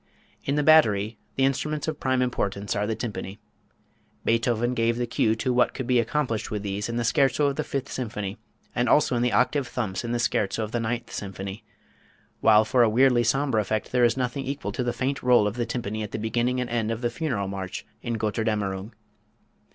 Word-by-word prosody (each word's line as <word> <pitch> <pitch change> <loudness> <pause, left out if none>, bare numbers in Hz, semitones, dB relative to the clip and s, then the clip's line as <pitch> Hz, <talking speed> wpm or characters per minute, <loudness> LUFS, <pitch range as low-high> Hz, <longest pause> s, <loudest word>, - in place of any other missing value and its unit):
In 140 - 0
the 150 - +2
"battery" 110 -9 +4 0.2
the 135 - +3
instruments 150 +3 -1
of 155 -2 -3
prime 130 -1 +1
importance 100 -5 -2
are 105 0 0
the 110 - -1
tympani. 105 -4 -5 0.9
Beethoven 115 +1 +1
gave 115 -1 +1
the 120 - 0
cue 110 -1 +1
to 125 +3 -1
what 125 0 +2
could 130 - -3
be 125 0 +3
accomplished 115 -1 -1
with 105 -2 -3
these 100 +2 -3
in 115 - -3
the 120 - 0
scherzo 140 +4 +2
of 140 -1 +1
the - - -1
Fifth 135 -2 -4
Symphony 105 -5 -4 0.3
and 120 +1 +1
also 145 -4 +4
in 120 - +1
the 125 0 +2
octave 135 +1 +2
thumps 105 -6 -3
in 120 - -3
the 120 - +1
scherzo 110 -2 0
of 105 - -5
the 120 - -1
Ninth 120 +1 -3
Symphony, 100 +2 -6 0.8
while 110 0 +5
for 125 +3 +3
a 115 - +5
weirdly 125 +1 +4
sombre 130 -1 +2
effect 110 +1 -2
there 125 -1 +3
is 120 +1 +3
nothing 130 +1 -2
equal 140 +2 -4
to 125 - -2
the 120 - 0
faint 135 +3 -2
roll 125 -4 +5
of 105 +1 -1
the 120 -1 -2
tympani 110 -3 -3
at 105 - -4
the - - -4
beginning 120 +3 0
and 125 -2 -3
end 115 -2 0
of 115 +1 -3
the 120 -1 0
Funeral 125 -9 -2
March 95 -1 -5 0.2
in 120 -1 -2
"Götterdämmerung." 105 -2 -2
120 Hz, 215 wpm, -26 LUFS, 105-125 Hz, 0.9 s, while